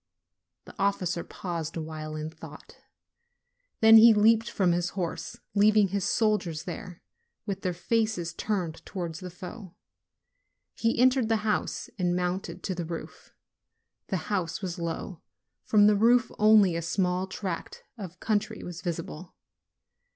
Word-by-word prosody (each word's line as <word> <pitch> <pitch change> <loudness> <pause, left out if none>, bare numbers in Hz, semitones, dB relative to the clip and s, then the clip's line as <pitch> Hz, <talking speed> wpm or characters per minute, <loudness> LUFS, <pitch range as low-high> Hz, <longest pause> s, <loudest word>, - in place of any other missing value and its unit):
The - - -12
officer 185 -3 0
paused 170 -4 -5
a - - -2
while 155 0 -6
in 155 +1 -5
thought; 160 - -13 1.0
then 220 0 +9
he 225 0 +8
leaped 225 +2 +4
from 185 -3 +1
his 175 0 0
horse, 175 -3 -4 0.2
leaving 205 0 +4
his 200 0 -1
soldiers 205 -8 0
there, 185 -7 -8 0.4
with 195 -2 -4
their 185 - -1
faces 215 -4 -1
turned 180 -4 -3
towards 170 -5 -5
the 185 - -7
foe, 185 +2 -10 1.0
he 230 0 0
entered 255 -2 +4
the 220 -1 0
house 215 - -1
and 175 -1 +1
mounted 180 0 -3
to 190 - -2
the 175 -1 -4
roof. 165 0 -8 0.7
The 190 - -1 0.2
house 170 -4 -1
was 180 -1 -4
low; 170 +1 -5 0.4
from 210 -1 +5
the 210 0 +5
roof 235 +4 +4
only 210 -4 +6
a 170 - -1
small 180 +2 0
tract 185 -2 -5
of 185 -6 -9
country 215 0 -1
was 175 0 -7
visible. 160 - -6
185 Hz, 145 wpm, -28 LUFS, 170-215 Hz, 1.0 s, then